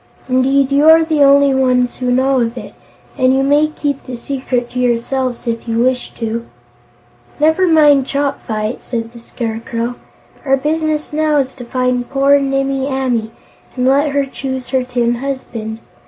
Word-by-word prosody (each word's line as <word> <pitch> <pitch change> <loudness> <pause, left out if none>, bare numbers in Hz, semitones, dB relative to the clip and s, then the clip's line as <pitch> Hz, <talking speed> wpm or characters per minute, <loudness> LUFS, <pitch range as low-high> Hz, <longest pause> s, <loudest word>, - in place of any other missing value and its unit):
Indeed, 265 +1 +2
you 290 +3 +5
are 325 0 +7
the 310 -2 0
only 280 0 +5
ones 250 -2 +1
who 250 -1 -2
know 260 +1 +2
of 235 +1 -1
it, - - -8 0.5
and 255 +1 +3
you 270 - +2
may 290 +2 +3
keep 290 -2 -3
the 255 - -7
secret 250 -1 -3
to 250 - -4
yourselves, 250 +1 -1
if 230 0 -3
you 225 0 -1
wish 250 +1 0
to." 230 0 -4 0.9
"Never 320 +5 +3
mind 295 -5 +4
Chopfyt," 250 -6 -2
said 230 -1 -5
the 235 - -11
Scarecrow. 230 0 -4 0.5
"Our 270 -1 +2
business 305 +1 -2
now 305 0 +1
is 270 -2 0
to 245 - -10
find 250 0 -1
poor 275 +1 +3
Nimmie 270 0 -1
Amee 255 -5 -1 0.5
and 250 -1 -1
let 280 +3 +3
her 280 0 0
choose 265 -1 -6
her 260 -1 +1
tin 245 -1 0
husband. 235 -4 -5
260 Hz, 165 wpm, -16 LUFS, 245-280 Hz, 0.9 s, are